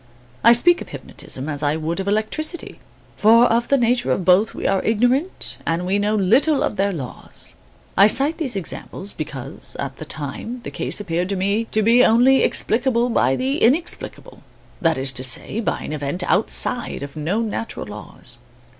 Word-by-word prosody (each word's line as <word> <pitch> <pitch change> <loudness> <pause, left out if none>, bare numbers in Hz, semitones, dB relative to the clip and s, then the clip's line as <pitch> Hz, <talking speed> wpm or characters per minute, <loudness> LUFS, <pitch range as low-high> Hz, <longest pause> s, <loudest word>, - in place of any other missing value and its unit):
I 235 - +8
speak 345 +9 +4
of - - -8
hypnotism 130 +2 -6
as 145 -2 -3
I 145 0 +1
would 160 +3 -3
of 195 - -4
electricity, 220 - -2 0.4
for 230 +3 +6
of 235 0 +1
the 280 - +3
nature 245 0 +1
of 185 - -1
both 185 +4 +3
we - - -6
are 195 - +2
ignorant 245 - 0
and 165 +2 -1
we 195 +2 +1
know 210 +1 0
little 245 - +3
of - - -2
their 200 0 +1
laws. 140 -9 -8 0.4
I 200 - +7
cite 280 +9 0
these 270 -9 0
examples 195 +1 -5
because, 140 -2 -6
at 135 -1 -5
the 155 - -8
time, 155 - -5
the - - -8
case - - -2
appeared 180 -2 -2
to 200 - -1
me 200 +4 0
to 215 -1 -1
be 235 +3 +5
only 250 +4 +5
explicable 240 +1 +1
by 135 - +2
the 270 - -1
inexplicable, 300 +9 -1 0.4
that 165 -3 +2
is 135 +1 -2
to 130 0 -2
say, 130 - 0
by 230 - -2
an - - -5
event 150 +4 -3
outside 220 - +1
of 140 +1 -8
known 200 +9 -2
natural 225 - -5
laws. 105 +3 -10
205 Hz, 180 wpm, -21 LUFS, 160-240 Hz, 0.4 s, I